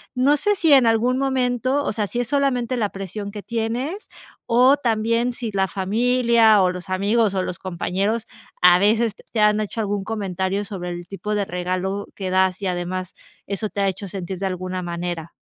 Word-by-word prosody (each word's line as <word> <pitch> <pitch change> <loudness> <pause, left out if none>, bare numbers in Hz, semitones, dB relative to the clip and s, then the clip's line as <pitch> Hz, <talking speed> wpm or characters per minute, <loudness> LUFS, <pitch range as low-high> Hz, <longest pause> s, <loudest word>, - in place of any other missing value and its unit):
No 280 +4 +3
sé 415 +6 +1
si 330 -5 +2
en 260 -4 +6
algún 235 +3 +2
momento 260 0 0
o - - 0
sea, 210 -2 -1
si 240 - -3
es 245 - -3
solamente 255 -3 +1
la 215 -3 +1
presión 200 +1 -6
que 205 -1 -8
tienes, 240 - -3 0.4
o 255 +4 +5
también 230 -1 0
si 235 -2 -5
la 195 -1 +1
familia, 225 +3 +3
o 180 -1 +3
los 180 +1 -8
amigos, 205 +3 +2
o 185 -1 0
los 180 - -5
compañeros 195 +5 -2 0.4
a 180 0 +7
veces 220 +2 +2 0.2
te 220 - +1
han 210 0 +4
hecho 215 +2 -3
algún 205 -1 -2
comentario 195 -2 -2
sobre 180 -4 -5
el 175 0 -6
tipo 210 +2 -4
de 205 - +1
regalo 185 +2 -3
que 190 -2 -4
das, 185 0 +2
y 195 - -1
además 185 +1 -3 0.3
eso 200 +2 -3
te 200 - -3
ha 195 - +3
hecho 195 +2 -6
sentir 185 -1 -6
de 195 - -2
alguna 185 0 -4
manera. 170 -1 -4
205 Hz, 195 wpm, -22 LUFS, 185-235 Hz, 0.4 s, a